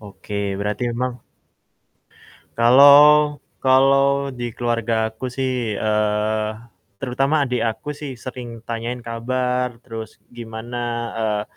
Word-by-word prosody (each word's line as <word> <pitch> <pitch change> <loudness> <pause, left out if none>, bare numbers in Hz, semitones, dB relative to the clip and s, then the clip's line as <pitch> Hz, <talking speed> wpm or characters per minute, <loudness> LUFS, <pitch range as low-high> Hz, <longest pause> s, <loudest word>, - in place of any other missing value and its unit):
Oke 105 0 -12 0.3
berarti 105 +2 -3
emang 125 +2 -2 1.4
Kalau 145 +4 +7 0.2
kalau 135 +1 +4
di 120 - -4
keluargaku 115 -1 -1
sih, 130 -1 0 0.2
eee, 105 +1 0 0.5
terutama 135 +3 0
adik 125 -1 -1
aku 110 - -10
sih 145 -2 -5
sering 125 -1 -7 0.2
tanyain 120 +2 -4
kabar 125 +2 -1
terus 115 -3 -9 0.2
gimana, 115 +1 -7 0.4
eee 105 -2 0
120 Hz, 100 wpm, -21 LUFS, 110-130 Hz, 1.4 s, Kalau